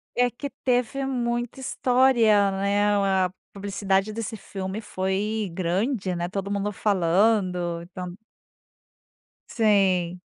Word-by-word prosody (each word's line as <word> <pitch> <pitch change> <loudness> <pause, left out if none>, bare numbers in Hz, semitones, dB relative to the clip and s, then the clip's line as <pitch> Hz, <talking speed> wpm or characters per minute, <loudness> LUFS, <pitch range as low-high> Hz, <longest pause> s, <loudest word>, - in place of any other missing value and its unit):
É 245 0 +3
que 280 +4 -6
teve 255 +2 +1
muita 240 -1 -2
história, 245 -6 +3
né, 200 +1 +1 0.4
a 180 - -4 0.2
publicidade 200 0 0
desse 225 0 -4
filme 195 +1 -5
foi 200 +2 -2
grande, 185 +3 -1
né, 175 0 -2
todo 195 +2 -4
mundo 205 +1 -1
falando, 185 -3 +1
então 180 0 -7 1.3
Sim. 190 -5 +2
200 Hz, 105 wpm, -25 LUFS, 185-230 Hz, 1.3 s, É